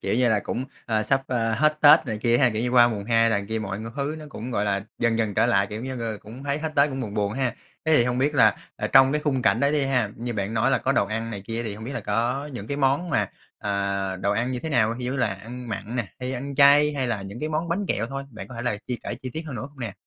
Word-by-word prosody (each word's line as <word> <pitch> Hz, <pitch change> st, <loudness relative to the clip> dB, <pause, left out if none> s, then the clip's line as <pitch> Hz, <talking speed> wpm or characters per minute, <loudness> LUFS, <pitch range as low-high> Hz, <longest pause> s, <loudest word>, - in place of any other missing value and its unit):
Kiểu 95 Hz, -, 0 dB
như 125 Hz, 0 st, +3 dB
là, 105 Hz, -2 st, +2 dB
cũng, 125 Hz, -, -3 dB, 0.2 s
ờ, 110 Hz, -2 st, +1 dB
sắp, 135 Hz, +3 st, +1 dB
a, 115 Hz, -3 st, 0 dB
hết 155 Hz, +3 st, +2 dB
Tết 145 Hz, -1 st, +7 dB
này 110 Hz, -2 st, -3 dB
kia 120 Hz, +2 st, +2 dB
ha, 130 Hz, -3 st, +4 dB
kiểu 110 Hz, +1 st, -2 dB
như, 125 Hz, -, 0 dB
qua 120 Hz, -1 st, +6 dB
mùng 105 Hz, -3 st, -4 dB
hai 115 Hz, 0 st, +3 dB
là 100 Hz, -2 st, +1 dB
kia 110 Hz, 0 st, -1 dB
mọi 100 Hz, -2 st, -4 dB
ng 115 Hz, +1 st, -6 dB
thứ 145 Hz, +3 st, -2 dB
nó 155 Hz, -, -9 dB
cũng, 125 Hz, -2 st, -7 dB
gọi 105 Hz, -4 st, 0 dB
là, 100 Hz, -1 st, -1 dB
dần 115 Hz, -1 st, +1 dB
dần 110 Hz, -3 st, 0 dB
trở -, -, +3 dB
lại, 100 Hz, 0 st, +3 dB
kiểu 105 Hz, +2 st, -6 dB
như, 130 Hz, -1 st, -5 dB
ờ, 110 Hz, -2 st, -3 dB
cũng 120 Hz, +6 st, -10 dB
thấy 140 Hz, +1 st, -1 dB
hết 160 Hz, 0 st, -3 dB
Tết, 140 Hz, +1 st, +5 dB
cũng 135 Hz, -, -4 dB
buồn 105 Hz, -5 st, -5 dB
buồn 100 Hz, -1 st, 0 dB
ha. 125 Hz, -1 st, -1 dB, 0.3 s
Thế 160 Hz, -1 st, +4 dB
thì 120 Hz, -, +5 dB
hông 125 Hz, 0 st, -1 dB
biết 145 Hz, +3 st, +1 dB
là, 135 Hz, -, +5 dB, 0.2 s
ờ, -, -, -2 dB
trong 135 Hz, +1 st, +6 dB
cái 150 Hz, -, +1 dB
khung 135 Hz, -4 st, 0 dB
cảnh -, -, +3 dB
đó 140 Hz, 0 st, +3 dB
đi 150 Hz, -2 st, +1 dB
ha, 125 Hz, -6 st, +1 dB
như 120 Hz, +2 st, -4 dB
bạn 100 Hz, +2 st, -2 dB
nói 110 Hz, -, +2 dB
là -, -, +3 dB
có -, -, 0 dB
đồ -, -, +2 dB
ăn 115 Hz, +2 st, -3 dB
này 100 Hz, -3 st, -5 dB
kia 115 Hz, +1 st, -3 dB
thì 105 Hz, -3 st, -4 dB
hông 110 Hz, +1 st, -9 dB
biết 135 Hz, -, -5 dB
là -, -, -3 dB
có 120 Hz, +7 st, -1 dB
những 105 Hz, -4 st, -6 dB
cái 140 Hz, -, -3 dB
món 145 Hz, +5 st, +1 dB
mà, 105 Hz, -4 st, +1 dB, 0.3 s
ờ, 100 Hz, -1 st, -1 dB
đồ 100 Hz, +2 st, 0 dB
ăn 120 Hz, +5 st, 0 dB
như 125 Hz, -, -3 dB
thế 160 Hz, -, -4 dB
nào, 115 Hz, -3 st, +2 dB
thì 125 Hz, -, -5 dB
như 130 Hz, +2 st, -2 dB
là 125 Hz, -, +2 dB
ăn 120 Hz, +5 st, -9 dB
mặn 110 Hz, +3 st, -5 dB
nè, 115 Hz, -6 st, -2 dB
hay 125 Hz, +1 st, -3 dB
ăn 140 Hz, +2 st, -5 dB
chay 145 Hz, +1 st, +6 dB
hay 130 Hz, -2 st, -1 dB
là 110 Hz, -5 st, -2 dB
những 100 Hz, +5 st, -8 dB
cái 155 Hz, -, -2 dB
món 155 Hz, +2 st, -2 dB
bánh 190 Hz, +4 st, -1 dB
kẹo 115 Hz, -, 0 dB
thôi, 135 Hz, +2 st, -5 dB
bạn 110 Hz, -, -9 dB
có 125 Hz, -, -10 dB
thể 120 Hz, -, -5 dB
là 105 Hz, -5 st, 0 dB
chia 125 Hz, -, -2 dB
kể -, -, -3 dB
chi 130 Hz, -, -5 dB
tiết 160 Hz, -, -4 dB
hơn 145 Hz, -, -6 dB
nữa 110 Hz, -, -5 dB
không 140 Hz, -2 st, -17 dB
nè? 115 Hz, -4 st, -4 dB
120 Hz, 320 wpm, -25 LUFS, 110-135 Hz, 0.3 s, Tết